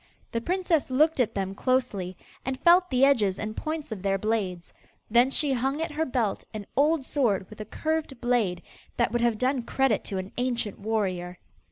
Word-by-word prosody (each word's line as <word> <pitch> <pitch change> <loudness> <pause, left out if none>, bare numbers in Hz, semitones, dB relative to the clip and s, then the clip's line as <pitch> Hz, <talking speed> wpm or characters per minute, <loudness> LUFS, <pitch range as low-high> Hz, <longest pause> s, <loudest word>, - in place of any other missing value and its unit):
The 230 - -1
princess 355 -1 0
looked 300 +4 +3
at 245 - +1
them 195 -1 -2
closely, 205 -6 -1 0.3
and 260 0 -3
felt 355 +1 +5
the 260 0 +4
edges 210 -9 +3
and 215 +1 -4
points 310 -4 -4
of 210 -4 -5
their 195 0 +1
blades, 195 -4 -2 0.4
then 240 +3 +5
she 280 0 +1
hung 265 +4 0
at 325 0 -2
her 310 +2 -1
belt 240 -7 -1
an 210 -1 -5
old 295 0 +3
sword 215 -11 +1
with 215 - -9
a - - -5
curved 310 +1 -2
blade, 230 -8 0 0.3
that - - +2
would 240 0 0
have 235 -2 +2
done 255 +2 +1
credit 265 -1 +1
to 195 - -4
an 185 +1 -5
ancient 240 -5 -1
warrior. 190 -5 -2
240 Hz, 190 wpm, -27 LUFS, 205-275 Hz, 0.4 s, felt